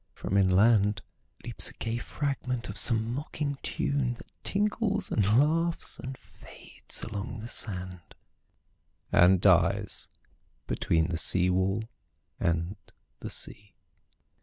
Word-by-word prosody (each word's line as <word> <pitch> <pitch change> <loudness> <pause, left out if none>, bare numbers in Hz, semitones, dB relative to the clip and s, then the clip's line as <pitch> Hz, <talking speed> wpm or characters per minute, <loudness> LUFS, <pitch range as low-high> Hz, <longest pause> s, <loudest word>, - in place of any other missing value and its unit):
From - - -5
inlandLeaps 100 +2 +1
a - - -12
gay 115 +1 -3
fragment 125 -3 -3
of 100 - -7
some 115 +1 +5
mocking 140 0 -4
tune, 140 -4 -1
That - - -16
tinkles 210 +1 0
and 105 - +2
laughs 165 +4 +1
and 130 0 -7
fades - - -7
along 105 0 -5
the 115 - -7
sand, 90 -6 -2 1.0
And 90 +1 +5
dies - - +2 0.6
between 80 0 0
the 85 -2 -2
seawall 95 +4 +2 0.6
and 85 +4 -1 0.4
the - - -6
sea. 100 -1 -5
110 Hz, 110 wpm, -28 LUFS, 95-135 Hz, 1.0 s, some